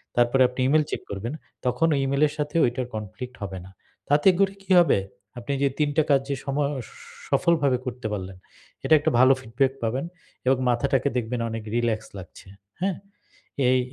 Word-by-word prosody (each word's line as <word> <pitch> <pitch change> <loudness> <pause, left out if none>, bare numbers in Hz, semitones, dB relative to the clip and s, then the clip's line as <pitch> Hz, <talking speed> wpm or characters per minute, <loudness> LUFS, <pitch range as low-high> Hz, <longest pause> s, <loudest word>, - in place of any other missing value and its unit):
তারপরে 120 +2 +3
আপনি 125 - -11
E-mail 155 +3 +4
check - - -3
করবেন 105 +6 -4 0.3
তখন 140 +6 +2
ওই 140 - +1
E-mail 140 +1 0
এর 145 - -8
সাথে 150 +1 -3
ওইটার 125 +1 -1
কনফ্লিক্ট 110 +5 -7
হবে 95 -1 -5
না। - - -12 0.4
তাতে 145 +4 +3
করে 195 0 +3
কী 195 - -7
হবে? 170 - +4 0.4
আপনি 120 +4 -4
যে 140 - +4
৩ 150 -1 +2
টা 155 - +5
কাজ 140 -2 +4
যে 140 - 0
সম 140 -1 -2 0.7
সফলভাবে 145 -6 +2
করতে 125 -2 -4
পারলেন, 95 -2 -6 0.5
এটা - - +3
একটা 150 - 0
ভালো 130 +1 +7
ফিডব্যাক 130 +3 0
পাবেন, 125 +6 -1 0.4
এবং 130 +1 +4
মাথাটাকে 130 +2 +1
দেখবেন 120 0 -2
অনেক 115 -1 -5
রিল্যাক্স 115 -2 0
লাগছে, 95 0 -12 0.3
হ্যাঁ? 190 -1 0 0.7
এই 130 0 +4
130 Hz, 175 wpm, -25 LUFS, 115-145 Hz, 0.7 s, ভালো